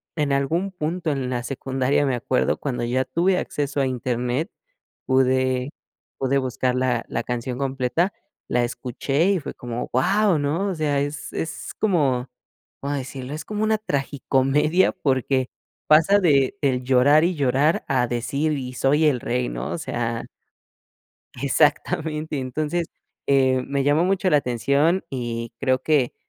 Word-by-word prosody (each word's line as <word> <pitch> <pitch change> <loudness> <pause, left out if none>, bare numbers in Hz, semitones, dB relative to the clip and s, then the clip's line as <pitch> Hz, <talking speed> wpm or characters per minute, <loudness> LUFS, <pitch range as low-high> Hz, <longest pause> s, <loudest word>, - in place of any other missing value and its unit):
en 150 -3 0
algún 165 +8 0
punto 170 -1 -2
en 135 -3 -2
la 120 - -1
secundaria 135 +2 0
me 130 -3 +1
acuerdo 125 +2 0
cuando 125 -4 -3
ya 125 +2 +1
tuve 180 +2 +1
acceso 145 -1 -2
a 135 - +2
internet 125 - -2 0.5
pude 130 0 +2 0.5
pude 135 +1 +1
buscar 130 -1 -1
la 125 -2 0
la - - -2
canción 125 +1 -3
completa, 135 +6 0 0.3
la 125 0 +1
escuché 130 +5 -1
y 190 - +1
fue 145 - -7
como, 120 0 -5
¡guau! 195 - +3
¿no? 155 +8 0
O 190 - -2
sea, 150 -3 0
es 145 +1 -5
es 160 - -5
como 140 - +1 0.5
como 145 +1 -2
decirlo 130 0 -6
es 150 0 -6
como 210 0 -3
una 220 0 +2
tragicomedia 145 - +1
porque 130 -1 0 0.4
pasa 165 +7 +6
de 145 -2 +3
del 130 -3 +1
llorar 135 +5 +5
y 175 0 +1
llorar 140 +3 +2
a 125 -2 +1
decir 140 +6 -1
y 130 -3 -4
soy 145 +5 +2
el 140 -5 +3
rey 60 -1 -1
¿no? - - -4
O - - -2
sea, 115 -1 -3 1.2
exactamente, 150 +1 +1
entonces, 155 +6 -2 0.4
eh, 130 -2 +3
me 140 -1 -1
llamó 150 +4 +3
mucho 190 0 +1
la 150 - +5
atención 140 +9 +1
y 120 -3 -4
creo 130 -1 +1
que 145 -6 +2
140 Hz, 150 wpm, -23 LUFS, 125-155 Hz, 1.2 s, pasa